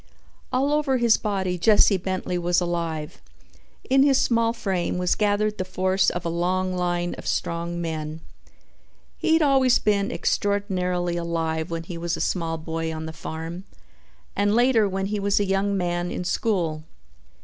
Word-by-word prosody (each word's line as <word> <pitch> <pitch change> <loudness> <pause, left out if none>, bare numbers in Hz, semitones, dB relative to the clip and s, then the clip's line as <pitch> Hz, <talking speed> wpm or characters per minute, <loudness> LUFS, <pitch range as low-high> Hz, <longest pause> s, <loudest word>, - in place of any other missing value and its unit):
All 275 +3 +1
over 295 -3 +2
his 235 -2 +4
body 190 -4 -2
Jesse 210 +1 +5
Bentley 185 -1 -2
was 175 0 +2
alive. 170 -3 -3 0.7
In 270 +1 +4
his 275 -1 +4
small 230 -1 +2
frame 190 -7 -2
was 180 0 +1
gathered 210 0 0
the - - +1
force 185 +1 +1
of 175 -1 -5
a - - +1
long 185 +2 0
line 175 -1 -1
of - - -8
strong 170 +1 -2
men. 160 -1 -4 1.0
He 320 - +2
had 325 0 +4
always 265 -3 +4
been 200 -1 +1
extraordinarily 180 -4 -1
alive 165 -1 -2
when 165 0 -3
he 170 0 -7
was 170 0 -2
a - - -7
small 165 -3 -1
boy 160 0 -3
on 160 0 -5
the 160 - -6
farm 165 +4 -6 0.7
and 205 +1 +2
later 235 -4 +4
when 195 0 -2
he 205 +1 -2
was 200 0 +1
a 205 - +1
young 195 +1 0
man 175 -1 -1
in 180 - -4
school. 175 -4 -1
185 Hz, 165 wpm, -24 LUFS, 170-205 Hz, 1.0 s, Jesse